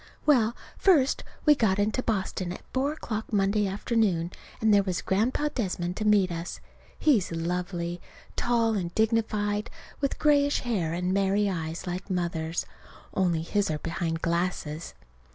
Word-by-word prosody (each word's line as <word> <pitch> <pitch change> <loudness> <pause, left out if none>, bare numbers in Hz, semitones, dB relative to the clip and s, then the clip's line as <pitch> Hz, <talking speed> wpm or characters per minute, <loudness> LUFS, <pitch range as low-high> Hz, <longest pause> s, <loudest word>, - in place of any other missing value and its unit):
Well, 240 -6 +4 0.2
first 300 -9 +4 0.2
we 300 - +8
got 215 -8 +2
into 210 +5 +1
Boston 190 -5 -2
at - - -7
four 270 +2 +1
o'clock 220 -8 -5
Monday 205 0 +2
afternoon, 195 -4 0 0.3
and 220 -1 +4
there 200 - +6
was 185 -2 -2
Grandpa 245 +9 +1
Desmond 180 -6 -2
to 215 - -2
meet 205 -3 +4
us. 170 +1 -5 0.4
He's 230 - +3
lovely 175 +1 -2 0.3
tall 230 -2 +2
and 180 -5 -2
dignified, 215 -1 +1 0.3
with 275 -1 -1
grayish 285 -1 +3
hair 200 -10 -1
and 180 +2 -1
merry 200 +1 +2
eyes 165 -3 -3
like 180 +2 -4
Mother's, 170 -3 -1 0.5
only 175 -4 +1
his 205 +3 0
are 155 - 0
behind 165 +1 -3
glasses. 170 -2 -2
195 Hz, 145 wpm, -27 LUFS, 175-225 Hz, 0.5 s, we